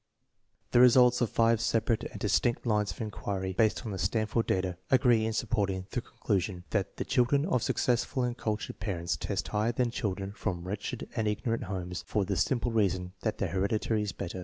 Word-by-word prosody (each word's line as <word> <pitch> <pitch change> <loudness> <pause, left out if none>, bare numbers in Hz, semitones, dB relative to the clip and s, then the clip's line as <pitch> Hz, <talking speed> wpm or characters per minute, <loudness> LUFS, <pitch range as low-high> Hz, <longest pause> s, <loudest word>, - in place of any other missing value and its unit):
The 120 - +5
results 125 0 +6
of 120 - +2
five 115 -1 +3
separate 115 0 +1
and - - -7
distinct 120 +1 +1
lines 105 -3 +1
of - - -6
inquiry 95 -3 -3
based 110 +4 +1
on 110 - -3
the 95 - -4
Stanford 110 +5 0
data 95 -1 0
agree 120 -4 +4
in - - -1
supporting 100 -5 -1
the 125 - -1
conclu 100 -4 -1
sion 90 -1 -5
that 100 -3 -1
the - - -3
children 140 +3 +2
of 165 -10 +1
successful 125 +3 0
and 120 -1 -1
cultured 110 -3 -3
parents 90 -4 -2
test - - -3
higher 105 +3 +1
than 120 0 0
children 100 -4 -3
from 90 -4 -4
wretched 105 +4 -4
and 110 -3 0
ignorant 115 +3 -1
homes 90 -2 -4
for 105 -2 0
the 100 0 -1
simple 120 +5 +1
reason 95 -5 0
that 110 -2 -1
their 95 - -1
heredity 105 +4 0
is 105 -2 -2
better. 85 +2 -6
105 Hz, 195 wpm, -30 LUFS, 95-120 Hz, -, results